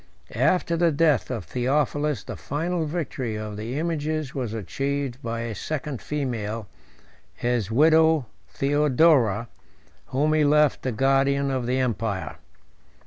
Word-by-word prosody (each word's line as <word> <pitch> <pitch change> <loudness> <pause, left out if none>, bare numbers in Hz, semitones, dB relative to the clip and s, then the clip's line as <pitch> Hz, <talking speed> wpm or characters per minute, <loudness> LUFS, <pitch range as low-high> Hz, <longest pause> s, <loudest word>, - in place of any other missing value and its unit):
After 175 -2 +2
the 170 0 +3
death 150 -3 +2
of 115 -8 -4
Theophilus, 140 - 0
the - - -7
final 165 +3 -2
victory 135 -8 -3
of 105 -1 -5
the 115 +6 -4
images 155 -3 -2
was 125 -5 -3
achieved 135 +5 -3
by 115 -2 -3
a 115 -1 -4
second 145 +3 -4
female, 115 -7 -3 0.7
his 120 -4 -1
widow 160 +3 +4 0.2
Theodora, 135 - +3 0.6
whom 150 +4 +1
he 155 -1 +3
left 150 -1 +3
the 130 - -2
guardian 135 +3 +2
of 130 -3 -2
the 125 +1 +1
empire. 115 -6 -2
135 Hz, 130 wpm, -25 LUFS, 115-150 Hz, 0.7 s, widow